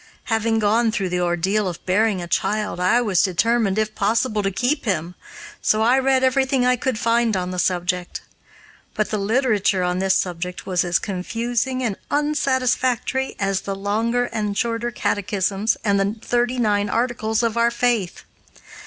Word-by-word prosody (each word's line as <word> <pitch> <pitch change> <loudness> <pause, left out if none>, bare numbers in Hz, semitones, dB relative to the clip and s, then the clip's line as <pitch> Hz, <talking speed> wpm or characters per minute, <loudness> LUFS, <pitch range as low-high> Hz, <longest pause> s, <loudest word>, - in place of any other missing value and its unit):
Having 225 0 +1
gone 220 +2 +2
through 195 -4 -2
the 180 0 -1
ordeal 180 +4 0
of 175 -3 -6
bearing 195 0 +1
a - - -7
child, 210 +3 -1
I 185 +7 +3
was 205 -7 +2
determined, 205 +2 +1
if 215 0 0
possible, 215 +1 0
to 195 - 0
keep 250 +9 -1
him, 180 -4 -1 0.5
so 215 +1 +2
I 250 +4 +4
read 265 0 +2
everything 260 -1 +2
I 250 0 +4
could 255 -1 -2
find 230 -2 +1
on 180 0 -3
the 180 - -3
subject. 180 0 -1 0.7
But 215 - -1
the 215 - -1
literature 210 -3 +1
on 180 0 0
this 190 0 +2
subject 180 0 -3
was 180 -1 +1
as 175 -1 +1
confusing 235 +6 -2
and 215 -5 -2
unsatisfactory 265 -3 0
as 195 -1 -1
the 195 - -4
longer 225 +5 0
and 210 -2 -2
shorter 235 0 -1
catechisms 205 -1 -1
and 200 -1 +2
the 200 +2 0
Thirty 245 +2 0
nine 205 -3 +1
Articles 230 -2 0
of 230 -1 0
our 235 0 +3
faith. 235 -6 -1
215 Hz, 165 wpm, -21 LUFS, 190-240 Hz, 0.7 s, I